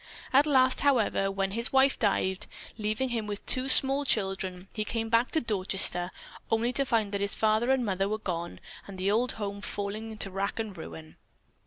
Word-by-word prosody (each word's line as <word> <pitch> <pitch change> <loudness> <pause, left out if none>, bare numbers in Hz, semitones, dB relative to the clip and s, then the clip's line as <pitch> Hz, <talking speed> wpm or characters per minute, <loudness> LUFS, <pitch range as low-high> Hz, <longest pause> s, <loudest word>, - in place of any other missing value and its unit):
At 280 +3 +5
last, 260 -3 +3
however, 235 -8 +1
when 195 0 -2
his 230 +4 +4
wife 270 0 +3
died, 190 -3 0 0.3
leaving 215 +4 -2
him 230 -3 -3
with 205 -1 -6
two 260 +1 -1
small 270 +2 +7
children, 190 -6 -2
he 215 - -2
came 225 +1 -4
back 230 +2 +2
to 320 - 0
Dorchester 190 -5 +1 0.4
only 230 +2 0
to 275 +2 -1
find 220 -5 0
that 200 -1 -3
his 200 0 +1
father 220 +3 +1
and 265 -2 +1
mother 195 -1 -1
were 215 - -2
gone 175 -5 -5 0.3
and 195 -1 -10
the 190 +2 0
old 240 +4 0
home 200 -1 -6
falling 205 +2 -5
into 215 -3 -4
rack 195 +1 -3
and 220 -4 -5
ruin. 80 - -11
215 Hz, 190 wpm, -28 LUFS, 195-240 Hz, 0.4 s, small